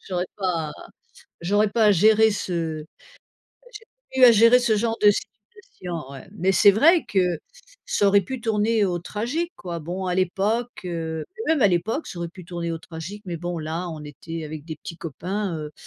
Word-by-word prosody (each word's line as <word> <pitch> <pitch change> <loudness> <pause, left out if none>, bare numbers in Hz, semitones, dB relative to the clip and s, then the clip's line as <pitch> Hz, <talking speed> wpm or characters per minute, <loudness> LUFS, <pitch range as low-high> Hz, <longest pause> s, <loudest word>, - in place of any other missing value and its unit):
j'aurai 180 -1 -1
pas 170 -6 -1 0.7
j'aurai 205 +5 +2
à - - -5
pas 215 -1 +4
gérer 220 +4 +5
ce 165 -6 -3
à - - -19 0.9
gérer 450 0 -11 0.3
j'ai 265 - -1
plus - - +10
à 240 - +9
gérer 230 +3 +6
ce 235 -3 +2
genre 225 +1 0
de 210 - +8
situation, 180 - -7
ouais, 135 -1 -11
mais 190 -1 +1
c'est 205 +1 +7
vrai 315 - +5
que 180 -4 +1 0.5
ça 205 - +2
aurait 200 0 +5
pu 250 +7 -6
tourner 220 -1 +1
au 180 -3 -1
tragique, 250 - -3
quoi. 170 -2 -6
Bon, 180 +4 -4
à 180 - 0
l'époque, 200 +6 0
heu, 165 -2 -4 0.2
mais 320 - +5
même 290 - 0
à 205 - +6
l'époque 215 - -1
ça 175 - -8
aurait 170 - -3
pu 180 +1 -12
tourner 170 -1 -4
au 165 - -3
tragique, 170 +5 -8
mais 175 -2 -3
bon, 175 +1 -4
là, 165 +3 -4
on 155 -2 -8
était 160 +3 -7
avec 155 -1 -7
des 160 -1 -7
petits 165 +3 -9
copains, 180 +4 -4
heu, 150 -1 -7
185 Hz, 200 wpm, -24 LUFS, 165-215 Hz, 0.9 s, plus